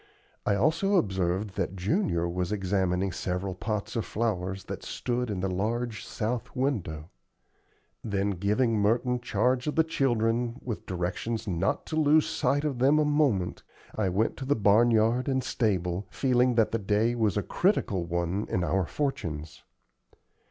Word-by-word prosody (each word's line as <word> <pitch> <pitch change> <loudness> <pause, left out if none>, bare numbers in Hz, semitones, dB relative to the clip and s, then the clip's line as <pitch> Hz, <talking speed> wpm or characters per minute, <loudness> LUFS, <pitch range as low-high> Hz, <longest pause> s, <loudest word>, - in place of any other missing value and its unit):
I 100 - +3
also 165 - +2
observed 95 - 0
that 95 -1 -1
Junior 95 - 0
was 90 +2 -2
examining 95 -2 0
several 90 +2 -3
pots 105 +3 -3
of 115 - 0
flowers 95 -4 -2
that - - -6
stood 125 -1 -2
in 100 -3 -2
the 95 - 0
large 110 +4 -2
south 115 +4 -3
window. 95 - -2 0.9
Then 100 -1 0
giving 105 +5 +1
Merton 120 +4 +2
charge 125 +3 0
of 150 - -1
the 160 - +5
children, 120 -5 0
with 115 -4 -5
directions 95 +6 -3
not 90 0 0
to 155 - -4
lose 155 0 +4
sight 145 +1 0
of 140 -5 -2
them 140 +4 +4
a 155 - +3
moment, 140 -12 +1 0.3
I 105 -3 +1
went 100 +5 0
to 130 - -5
the 145 +2 +2
barn 105 +3 +4
yard 115 +3 +2
and 130 -2 +1
stable, 95 -6 -1
feeling 125 0 +2
that 115 -2 +3
the 115 - 0
day 105 +4 +1
was 110 -4 +1
a 105 - 0
critical 120 - +1
one 85 +4 -2
in 90 - 0
our 95 -1 0
fortunes. 85 - -3
110 Hz, 160 wpm, -28 LUFS, 95-125 Hz, 0.9 s, the